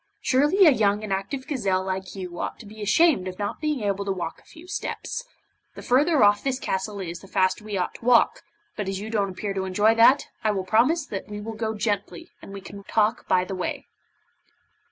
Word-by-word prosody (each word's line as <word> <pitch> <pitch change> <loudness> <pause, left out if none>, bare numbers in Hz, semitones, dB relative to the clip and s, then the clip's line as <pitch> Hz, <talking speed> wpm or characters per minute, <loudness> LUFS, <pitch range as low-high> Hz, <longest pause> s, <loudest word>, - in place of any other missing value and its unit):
Surely 295 +9 +4
a 315 - +8
young 210 -4 +2
and 205 -2 -2
active 195 +8 -3
gazelle 195 -10 0
like 190 0 -4
you 180 -2 -7
ought - - -3
to 230 - -11
be 215 +1 -11
ashamed 215 - +3
of 185 0 -6
not 205 +6 -4
being 300 -5 -1
able 200 -1 -1
to 200 - -2
walk 175 -3 -4
a - - -23
few 330 +2 -15
steps. - - -4 0.5
The - - -9
further 285 +2 +3
off 205 0 +4
this 270 -2 0
castle 200 -3 -3
is 170 -2 -5
the 195 - -14
faster 185 +1 +1
we 210 -2 -4
ought 180 - -1
to - - -13
walk, 245 -1 +4 0.3
but 205 -2 -3
as 195 -1 -3
you 215 +2 -6
don't 205 -3 0
appear 195 +2 -4
to 190 -1 -2
enjoy 205 +4 +3
that, 235 +5 +5 0.2
I 215 - +2
will 190 -2 -3
promise 255 - +3
that 195 -7 -6
we 210 0 -6
will 225 +2 -6
go 220 0 -3
gently, 205 -4 -3
and - - -11
we 200 0 -7
can 200 +1 -10
talk 220 +1 +1
by 185 0 +3
the 195 - -5
way. 185 -1 -4
205 Hz, 225 wpm, -25 LUFS, 190-235 Hz, 0.5 s, a